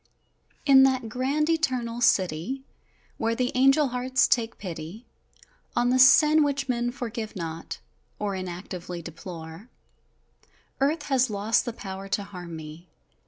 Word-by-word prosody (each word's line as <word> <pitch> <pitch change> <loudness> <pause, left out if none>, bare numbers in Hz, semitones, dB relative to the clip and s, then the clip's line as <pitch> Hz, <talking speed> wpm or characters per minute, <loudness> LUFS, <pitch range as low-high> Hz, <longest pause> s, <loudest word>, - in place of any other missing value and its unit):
In 270 -2 +7
that 260 -3 +2
grand, 270 +6 0
Eternal 255 -8 -1
City, 190 +5 +1 0.6
Where 225 0 0
the 250 +1 0
angel 270 +2 +4
hearts 255 +2 +1
take 230 -1 0
pity 175 +4 -7 0.7
On 245 +1 +2
the 255 - +3
sin 300 +4 +7
which 280 -1 -1
men 240 -1 0
forgive 230 -3 -5
not, 165 -2 -5 0.4
Or 205 -1 -2
inactively 180 -1 -6
deplore, 165 +5 -9 1.1
Earth 290 +3 +1
has 260 -3 +2
lost 210 +2 +1
the 240 - -2
power 195 -2 -7
to 200 +1 -1
harm 180 -4 -9
me! 160 +2 -10
230 Hz, 130 wpm, -26 LUFS, 185-265 Hz, 1.1 s, In